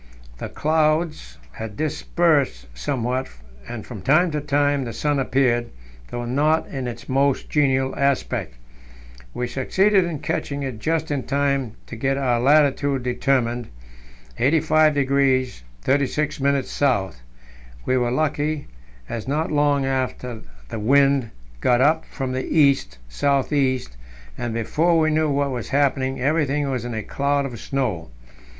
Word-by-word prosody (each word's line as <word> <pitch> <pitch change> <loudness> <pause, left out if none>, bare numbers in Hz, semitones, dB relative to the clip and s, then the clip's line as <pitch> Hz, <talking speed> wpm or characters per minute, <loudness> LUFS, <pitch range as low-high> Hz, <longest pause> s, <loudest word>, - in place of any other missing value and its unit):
The - - -5
clouds 155 - 0
had 105 - -7
dispersed 150 - +1
somewhat, 125 - -2 0.4
and 120 -3 -6
from 110 -6 -8
time 155 - +3
to 150 -1 -2
time 145 -1 +1
the 115 -2 -5
sun 145 -2 0
appeared, 125 -3 +1 0.4
though 120 0 -4
not 150 +6 +1
in 135 -3 -4
its 120 -1 -7
most 135 +1 +1
genial 135 -3 +2
aspect. 140 - -1 0.8
We 125 - -1
succeeded 190 +11 +2
in 170 -3 -3
catching 140 0 -3
it 130 -5 -5
just 160 +3 -1
in 140 -2 0
time 140 -4 0
to - - -8
get 135 +4 0
our 125 -4 +1
latitude 140 0 +3
determined 125 -1 0 0.7
85° 140 - +2 0.2
36' 145 +2 0
S. 130 - 0 0.6
We 130 - +1
were 120 -2 +1
lucky, 150 +2 -1 0.4
as 115 +1 -5
not 155 +4 -1
long 145 -2 +2
after 130 -3 -2 0.3
the - - -4
wind 135 +1 +3 0.3
got 120 - +3
up 155 +4 +3
from 135 -3 -4
the 130 0 -2
east 140 - +2
south 140 - 0
east, 130 - 0 0.4
and, 120 - -4
before 155 +10 +1
we 155 -1 +3
knew 155 0 +2
what 140 0 0
was 125 -3 -4
happening, 135 -2 +1
everything 145 +1 +1
was 125 -2 -3
in 120 -1 -4
a 110 - -3
cloud 140 +3 0
of 120 -4 -6
snow. 110 - -2
135 Hz, 140 wpm, -22 LUFS, 125-145 Hz, 0.8 s, time